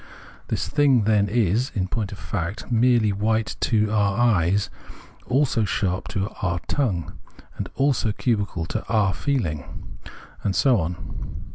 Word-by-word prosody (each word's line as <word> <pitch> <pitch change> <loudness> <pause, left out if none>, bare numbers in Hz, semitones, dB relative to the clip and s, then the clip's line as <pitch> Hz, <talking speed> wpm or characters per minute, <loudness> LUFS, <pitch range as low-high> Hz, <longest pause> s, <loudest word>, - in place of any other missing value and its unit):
This - - -2
thing, 140 -6 +3
then, 105 -1 +3
is, 115 +3 +1
in 95 -3 0
point 100 0 -3
of 100 - -7
fact, 95 +5 -4
merely 120 -2 +4
white 110 +2 0
to 110 -3 +1
our 105 -1 +2
eyes, 100 -5 +2 0.6
also 130 -3 +2
sharp 95 -2 -1
to 100 +1 -2
our 85 -3 0
tongue, 100 - -1 0.4
and - - -5
also 135 -5 +2
cubical 100 -7 -1
to 110 +6 -3
our 105 -4 +2
feehng, 90 - -1 0.8
and 100 -2 0
so 130 -6 +4
on. 85 -1 -5
105 Hz, 140 wpm, -24 LUFS, 95-120 Hz, 0.8 s, merely